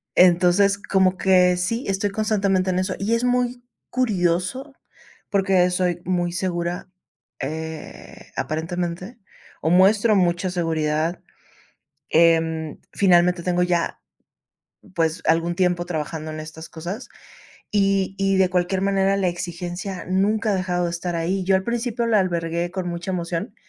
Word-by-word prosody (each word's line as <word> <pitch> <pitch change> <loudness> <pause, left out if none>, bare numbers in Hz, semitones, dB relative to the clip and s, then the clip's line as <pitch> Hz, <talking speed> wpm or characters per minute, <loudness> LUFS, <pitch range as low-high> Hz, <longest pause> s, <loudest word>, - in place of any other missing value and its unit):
Entonces 180 +3 +5
como 190 -2 +1
que 180 -1 +4
sí, 230 +8 -1
estoy 195 +1 0
constantemente 200 -3 +1
en 185 0 +1
eso 185 0 -1
y 220 +4 +1
es 230 - -1
muy 250 0 0 0.3
curioso 215 - -1 0.5
porque 190 -2 +3
soy 180 -1 0
muy 175 -1 0
segura, 175 0 -3 0.5
eh, 160 +3 -7
aparentemente 175 +6 -3 0.5
o - - +3
muestro 200 +5 +5
mucha 180 0 +1
seguridad, 160 -1 -1 0.9
em, 160 -1 +2
finalmente 180 -2 +3
tengo 180 -1 +1
ya, 175 -1 0 1.0
pues 165 0 0
algún 165 +2 +2
tiempo 180 -1 +1
trabajando 155 -1 -4
en 155 0 -6
estas 155 +1 -9
cosas 175 +9 -6 0.6
y 195 -2 +1
y 195 0 +2
de 190 -1 +3
cualquier 185 +1 0
manera, 195 0 +2
la 195 -2 +1
exigencia 175 +2 -5
nunca 210 +4 +1
ha - - +1
dejado 180 -1 -1
de 170 - -1
estar 170 0 -3
ahí. 185 +3 -1
Yo 190 +1 +4
al 190 - -1
principio 235 0 -1
la 220 -2 +3
albergué 170 -1 -1
con 185 -2 -3
mucha 170 +2 -4
emoción 175 +3 -3
180 Hz, 135 wpm, -22 LUFS, 170-195 Hz, 1.0 s, Entonces